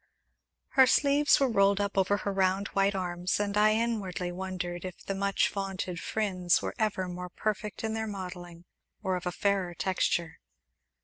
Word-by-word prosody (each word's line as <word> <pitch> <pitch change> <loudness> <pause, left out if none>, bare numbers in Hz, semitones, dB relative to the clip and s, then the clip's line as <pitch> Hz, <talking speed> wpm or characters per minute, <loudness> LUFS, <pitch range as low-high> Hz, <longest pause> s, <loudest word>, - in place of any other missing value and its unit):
Her 265 -1 +6
sleeves 285 +2 +4
were 275 - +3
rolled 200 -3 +3
up 200 -1 -1
over 195 +1 +2
her 200 0 -3
round, 195 +1 +1
white 195 0 +1
arms, 180 0 -1
and 205 -1 -1
I 215 +1 +4
inwardly 205 -6 -1
wondered 180 -1 -4
if 185 -2 -8
the 195 - -2
much 200 0 +1
vaunted 190 -3 -4
Phryne's 185 -5 +1
were - - -4
ever 205 -4 0
more 180 0 -6
perfect 210 +2 -3
in 220 0 -1
their 220 0 -2
modelling, 180 -3 -7 0.4
or 190 -1 0
of 180 0 -4
a - - 0
fairer 190 -2 0
texture. 170 -3 -1
195 Hz, 170 wpm, -29 LUFS, 180-205 Hz, 0.4 s, Her